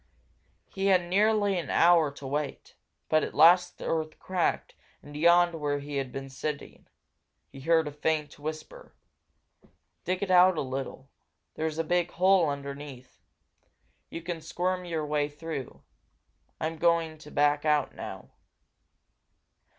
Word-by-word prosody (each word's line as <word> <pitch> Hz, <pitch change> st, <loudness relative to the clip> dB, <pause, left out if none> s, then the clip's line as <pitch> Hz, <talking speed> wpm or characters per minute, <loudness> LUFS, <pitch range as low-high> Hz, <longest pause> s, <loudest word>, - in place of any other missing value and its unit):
He 195 Hz, 0 st, -3 dB
had 185 Hz, -2 st, +4 dB
nearly 205 Hz, +1 st, +2 dB
an 170 Hz, -, -6 dB
hour 170 Hz, -3 st, +5 dB
to 140 Hz, -, -11 dB
wait. 145 Hz, +1 st, -4 dB, 0.3 s
But 155 Hz, 0 st, +2 dB
at -, -, -5 dB
last 175 Hz, +3 st, +5 dB
the -, -, -8 dB
earth 155 Hz, -1 st, -2 dB
cracked 185 Hz, -2 st, -1 dB, 0.3 s
and 145 Hz, 0 st, -12 dB
yawned 170 Hz, +2 st, +4 dB
where 145 Hz, -3 st, -2 dB
he 145 Hz, 0 st, -5 dB
had 135 Hz, -2 st, -3 dB
been 135 Hz, 0 st, -6 dB
sitting. 140 Hz, +2 st, -6 dB, 0.6 s
He 135 Hz, -, -11 dB
heard 160 Hz, +1 st, +2 dB
a -, -, -4 dB
faint 150 Hz, 0 st, -2 dB
whisper. 155 Hz, -, -8 dB, 1.1 s
"Dig 185 Hz, +2 st, -2 dB
it 195 Hz, -, -2 dB
out 180 Hz, -1 st, +6 dB
a -, -, 0 dB
little 135 Hz, 0 st, -6 dB, 0.4 s
there's 160 Hz, 0 st, -3 dB
a 165 Hz, -, 0 dB
big 175 Hz, +1 st, 0 dB
hole 185 Hz, -3 st, +4 dB
underneath. 140 Hz, -2 st, -8 dB, 0.9 s
You 165 Hz, -, -7 dB
can 170 Hz, -1 st, -5 dB
squirm 180 Hz, +3 st, -2 dB
your 165 Hz, -3 st, -3 dB
way 150 Hz, 0 st, 0 dB
through. 150 Hz, -3 st, -7 dB, 0.8 s
I'm 160 Hz, +1 st, -3 dB
going 165 Hz, -2 st, +1 dB
to 150 Hz, -, -12 dB
back 145 Hz, 0 st, +2 dB
out 150 Hz, -3 st, +1 dB
now." -, -, -9 dB
160 Hz, 145 wpm, -28 LUFS, 145-175 Hz, 1.1 s, out